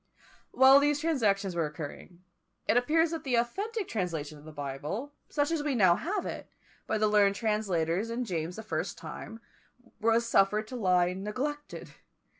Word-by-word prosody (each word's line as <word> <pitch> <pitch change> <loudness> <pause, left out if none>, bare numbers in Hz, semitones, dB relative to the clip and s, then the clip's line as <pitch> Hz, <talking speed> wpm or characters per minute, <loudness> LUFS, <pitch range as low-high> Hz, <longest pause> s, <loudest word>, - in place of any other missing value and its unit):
While 265 +1 +7
these 290 0 +2
transactions 210 - +1
were 165 -2 +1
occurring, 155 +4 -9 0.4
it - - +3
appears 315 +7 +3
that 330 -1 -4
the 260 -4 0
authentic 395 - -1
translation 160 -7 -3
of 145 - -16
the 155 - -9
Bible, 150 - -5 0.2
such 290 +1 0
as 330 -2 0
we 290 -2 -1
now 185 -6 +5
have 375 - -2
it, - - -6 0.4
by 220 - 0
the 215 0 +2
learned 205 -1 +4
translators 200 -3 0
in 240 +2 -2
James 170 -3 -3
the 220 - -7
First's 220 - -3
time, 225 +1 -9 0.6
was 230 +1 +2
suffered 210 0 +3
to 255 - -6
lie 180 -5 +2
neglected. 255 +10 -5
215 Hz, 165 wpm, -29 LUFS, 180-275 Hz, 0.6 s, While